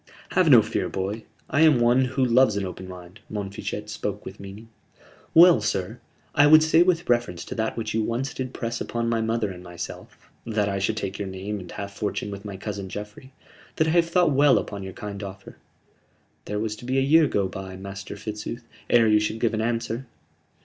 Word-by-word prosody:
"Have - - +3
no - - +8
fear, - - -2
boy. 100 +4 -4 0.2
I 145 - +1
am 155 -6 +6
one 120 +2 +4
who 130 +1 0
loves 120 -3 +4
an 100 - -1
open 95 0 -7
mind." 90 +1 -11
Montfichet 105 0 -5
spoke 105 -1 -4
with 95 - -9
meaning. 100 +3 -10 0.7
"Well, 170 +1 +8
sir, 95 -2 -2 0.3
I 145 +1 +6
would 155 +1 +8
say 160 +1 +4
with 175 -1 +2
reference 120 -8 0
to - - -6
that 110 0 -2
which 115 - -3
you 110 - +1
once 120 +5 -2
did 130 -1 -4
press 115 -2 -4
upon 115 0 -2
my 115 -1 +1
mother 110 -2 -1
and 90 -1 -10
myself 85 -1 -9
that 105 -3 0
I 100 -1 -1
should 110 +3 -1
take 100 -1 -4
your 100 - -3
name 95 +2 -5
and 90 - -10
half 100 -1 -7
fortune 105 -1 -3
with 100 +1 -8
my 100 -2 -6
cousin 100 -1 -5
Geoffrey 105 +7 -8 0.4
that 160 - +2
I - - +2
have 170 0 +3
thought 175 -2 +3
well 140 0 +5
upon 100 -1 -4
your 95 -1 -7
kind 105 -2 -7
offer." 95 -1 -9 0.9
"There 105 - -3
was 105 0 -2
to 120 - -11
be 130 +2 0
a - - +4
year 155 +3 +5
go 100 -7 0
by, 95 0 -7
Master 100 +1 -7
Fitzooth, 105 +3 -6 0.3
ere 120 -1 +5
you 105 0 +5
should 105 +1 -2
give 115 -1 +1
answer." 115 +2 -2
110 Hz, 210 wpm, -25 LUFS, 100-125 Hz, 0.9 s, no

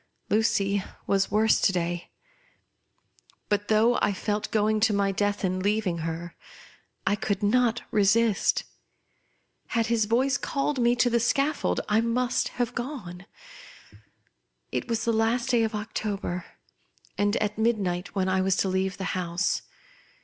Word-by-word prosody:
Lucy 200 -2 +2 0.2
was 195 -1 +1
worse 215 +2 +3
to - - +4
day; 175 -1 -3 1.4
but 205 0 0
though 225 +3 +3
I 205 - +2
felt 210 +2 -2
going 215 0 +2
to 215 0 +3
my 200 -1 +1
death, 205 +1 -1
in 185 0 -1
leaving 200 -3 0
her, 165 +1 -4 0.7
I 195 +1 +2
could 205 -1 -2
not 240 +2 +2
resist. 210 +1 +3 1.0
Had 230 -1 0
his 220 -2 +2
voJfe 265 +5 +1
called 275 0 -1
me 240 0 +3
to 245 0 +3
the 235 - +3
scaffold, 275 +5 +1
I 215 +2 +3
must 240 +2 0
have 245 0 -1
gone. 215 -9 -6 1.4
It - - -2
was 230 -1 -1
the 230 - +2
last 235 +3 +1
day 240 -2 +3
of 220 -1 -1
October, 205 -4 -3 0.7
and 205 +1 +1
at 210 0 -1
midnight, 200 -6 0
when 190 -1 +1
I 185 0 +2
was 190 0 +2
to 190 - 0
leave 190 +1 -1
the 195 - -5
house. 180 +1 -1
210 Hz, 145 wpm, -26 LUFS, 195-230 Hz, 1.4 s, to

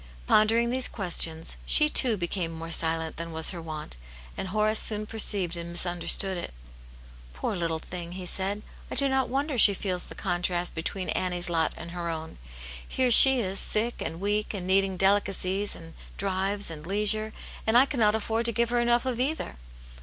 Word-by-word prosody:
Pon 215 0 +4
dering 235 +2 +1
these 255 0 0
questions, 165 -5 -2
she, 300 - +5
too, 245 -7 +5
became 175 -1 -3
more 165 0 -8
silent 160 0 -1
than 165 +1 -6
was 160 0 0
her 175 -3 -8
wont, 155 - -8 0.4
and 190 - -5
Horace 215 +2 0
soon 215 -1 +2
perceived 205 -5 0
and 170 0 -6
misunderstood 175 +2 +1
it. - - -7 0.8
"Poor 65 - -4
little 165 -2 -2
thing!" 175 +1 -8
he 185 0 -7
said, 195 +3 -1 0.3
"I - - -6
do 280 - +1
not 265 -1 0
wonder 275 0 -2
she 205 -1 +6
feels 185 -2 -4
the - - -12
contrast 175 -1 -2
between 180 +3 -4
Annie's 180 -1 -2
lot 165 -2 0
and 170 - -9
her 175 -1 -5
own! 160 - -7 0.5
Here 255 -1 0
she 265 +2 +10
is 195 -1 -2
sick 230 +3 -1
and 165 - -5
weak, 210 +2 -2
and 185 -2 -5
needing 190 0 +1
delicacies, 195 0 0
and 165 0 -12 0.2
drives, 195 0 -2
and 150 -2 -9
leisure, 210 +4 0 0.4
and 220 +2 +4
I 260 - +6
cannot 225 -7 +1
afford 225 +1 -2
to 235 - +4
give 235 +1 -1
her 240 - +1
enough 240 +1 +1
of 250 -2 -3
either! 275 - -3
195 Hz, 185 wpm, -26 LUFS, 170-220 Hz, 0.8 s, she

